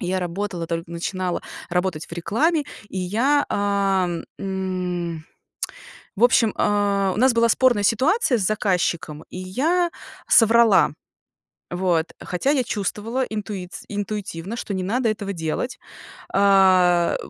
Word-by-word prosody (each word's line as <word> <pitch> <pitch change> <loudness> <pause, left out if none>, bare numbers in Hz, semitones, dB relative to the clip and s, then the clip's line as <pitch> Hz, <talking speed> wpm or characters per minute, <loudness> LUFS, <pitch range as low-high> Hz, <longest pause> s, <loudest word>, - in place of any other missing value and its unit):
Я 185 -1 -1
работала, 180 -1 -3
только 165 0 -4
начинала 180 +1 -3 0.3
работать 180 -3 -1
в - - -17
рекламе, 290 - +1 0.3
и 190 - -5
я, 240 +11 +2
а, 200 -2 +1 0.3
м, 180 -4 -3 0.9
в 220 - -3
общем, 235 -3 +4
а, 200 -2 +1
у - - -4
нас 260 +1 +5
была 230 0 +4
спорная 240 -5 +3
ситуация 265 - +2
с 205 - -1
заказчиком, 180 -7 -1
и - - -9
я 315 - 0 0.4
соврала. 225 -3 +5 0.8
Вот. 175 -2 +1
Хотя 185 +11 -1
я 270 -4 +2
чувствовала 215 +5 -2
интуиц 205 -5 -6
интуитивно, 205 -1 -4
что 205 - -4
не 185 -1 -2
надо 230 +5 0
этого 205 -2 -3
делать. 165 +9 -3 0.5
А, 185 -3 +4
195 Hz, 125 wpm, -22 LUFS, 180-225 Hz, 0.9 s, нас